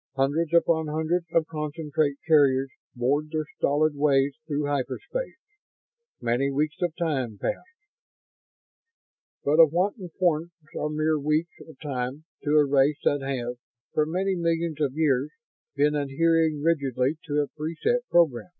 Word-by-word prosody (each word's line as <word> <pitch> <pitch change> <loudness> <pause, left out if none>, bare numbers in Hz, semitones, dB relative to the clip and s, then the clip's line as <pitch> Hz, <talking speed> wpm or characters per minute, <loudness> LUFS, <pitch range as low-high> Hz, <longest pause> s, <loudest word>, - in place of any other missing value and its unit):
Hundreds 145 +5 +1
upon 170 -2 +3
hundreds 160 +3 -1
of 165 -1 +2
concentrate 150 -1 -2
carriers 135 -4 +4 0.2
bored 140 +5 0
their 155 -1 -1
stolid 150 +2 +2
ways 140 -1 +2
through 145 -1 -1
hyperspace. 145 - -3 0.8
Many 120 +4 0
weeks 150 +2 -1
of 175 -3 -1
time 135 - -2
passed. 265 - -3 1.8
But 150 +3 +2
of 160 -3 +8
what 185 +5 +1
importance 175 -2 -1 0.2
are 150 - -2
mere 155 0 0
weeks 155 +4 0
of 160 -5 -15
time 135 0 -4 0.2
to 145 - -2
a 150 - +6
race 140 +1 +3
that 145 -1 +2
has, 125 -3 -3 0.4
for 150 0 +2
many 190 +4 0
millions 165 -2 -1
of 140 -3 +1
years, 145 -3 +1 0.5
been 145 +1 +3
adhering 155 +1 +1
rigidly 140 -3 +1
to 150 -2 +1
a 145 - -2
pre 155 +3 -5
set 245 0 +1
program? 165 -4 +2
150 Hz, 140 wpm, -26 LUFS, 140-165 Hz, 1.8 s, of